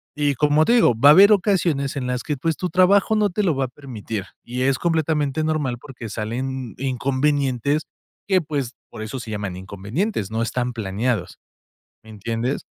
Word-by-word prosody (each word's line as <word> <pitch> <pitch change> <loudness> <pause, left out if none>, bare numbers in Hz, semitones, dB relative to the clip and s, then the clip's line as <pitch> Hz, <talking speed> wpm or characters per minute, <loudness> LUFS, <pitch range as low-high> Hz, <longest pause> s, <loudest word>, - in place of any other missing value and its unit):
Y, 145 -2 +1
como 150 +3 +3
te 235 - +3
digo, 225 - +5
va 140 +5 +7
a - - +11
haber 200 +6 +8
ocasiones 170 -9 +1
en 125 - -3
las 125 -1 -2
que, 150 -3 -2
pues, 165 +4 -1
tu 180 - -2
trabajo 195 +4 +4
no 210 -1 +2
te 210 +3 -1
lo 175 -5 +2
va 135 0 0
a - - -5
permitir, 115 -7 -6 0.2
y 125 +1 -4
es 135 0 +2
completamente 155 -3 0
normal, 150 -6 -1
porque 125 -2 -9
salen 125 +3 -4
inconvenientes 135 +2 0 0.5
que, 190 -1 +4
pues, 145 -6 -3 0.2
por - - -9
eso 110 +5 -5
se 115 -2 -7
llaman 100 -3 -4
inconvenientes, 100 - -3
no 110 +1 -1
están 120 +2 -1
planeados, 105 -1 -2 0.7
¿me 110 - -16
entiendes? 115 +5 -3
135 Hz, 185 wpm, -22 LUFS, 115-155 Hz, 0.7 s, a